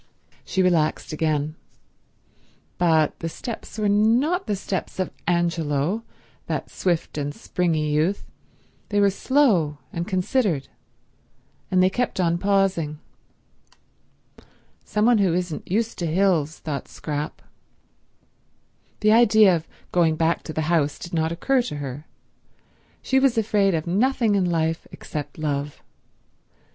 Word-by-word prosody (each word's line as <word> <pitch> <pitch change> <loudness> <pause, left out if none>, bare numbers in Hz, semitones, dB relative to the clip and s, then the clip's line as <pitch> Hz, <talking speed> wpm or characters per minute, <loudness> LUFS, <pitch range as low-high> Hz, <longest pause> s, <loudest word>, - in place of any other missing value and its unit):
She 190 - 0
relaxed 165 -4 +1
again. 155 -1 0 1.3
But 160 -3 +2
the 165 - -3
steps 225 +7 -7
were 215 -1 +1
not 235 - +2
the 210 - 0
steps 190 -1 -4
of 185 -2 -2 0.2
Angelo, 170 +1 0 0.5
that - - -3
swift 170 -4 -1
and 145 0 -3
springy 160 -4 -1
youth; 165 +7 0 0.6
they 205 - +1
were 200 -1 +4
slow 200 - +2 0.2
and 170 +1 -3
considered, 185 - 0 1.0
and 185 -1 +3
they 185 - +5
kept 245 -2 -1
on 170 -1 +1
pausing. 195 -6 +1 1.9
"Some 210 0 0
one 240 -2 +5
who 185 -4 +2
isn't 180 -3 -3
used 225 +4 -1
to 170 - -1
hills," 165 -3 +1
thought 145 -4 -5
Scrap. 150 -1 -5 1.6
The 215 0 +4
idea 220 -4 +6
of 160 -1 -5 0.2
going 165 -3 +3
back 165 +1 +1
to - - -5
the 155 - -1
house 155 -2 +1
did 175 - -9
not 160 -1 +1
occur 255 +10 +1
to 240 -10 -5
her. 145 +1 -6 1.0
She 265 - +3
was 265 -3 +2
afraid 205 -4 +2
of 155 - -2
nothing 225 +4 +2
in 195 -2 +2
life 165 -1 -1
except 150 -2 -7
love. 145 -2 -3
175 Hz, 130 wpm, -23 LUFS, 155-205 Hz, 1.9 s, idea